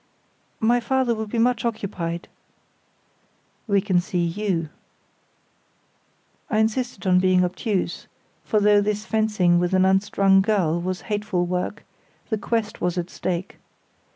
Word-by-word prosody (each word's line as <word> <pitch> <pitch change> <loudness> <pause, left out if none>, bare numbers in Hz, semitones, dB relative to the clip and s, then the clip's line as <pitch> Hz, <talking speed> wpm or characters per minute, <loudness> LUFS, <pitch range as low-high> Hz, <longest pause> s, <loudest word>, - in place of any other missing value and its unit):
"My 235 +2 +3
father 260 0 +1
will 220 -1 -4
be 220 - -4
much 235 0 +2
occupied." 185 -7 -3 1.4
"We 200 -2 +3
can 185 -3 +2
see 175 -1 -1
you." 170 -3 -2 1.8
I 215 - 0
insisted 220 -1 -1
on 180 -1 +4
being 185 -1 +3
obtuse, 185 0 -2 0.4
for 215 - +1
though 205 0 +5
this 210 +1 -2
fencing 210 -6 +2
with 180 +1 +1
an 185 0 +4
unstrung 195 0 +3
girl 185 -5 +1
was 185 +1 -3
hateful 205 -4 -1
work, 180 +3 -3 0.5
the 220 - 0
quest 225 0 -2
was 180 0 -1
at 175 0 -3
stake. 180 0 -4
195 Hz, 130 wpm, -23 LUFS, 180-220 Hz, 1.8 s, though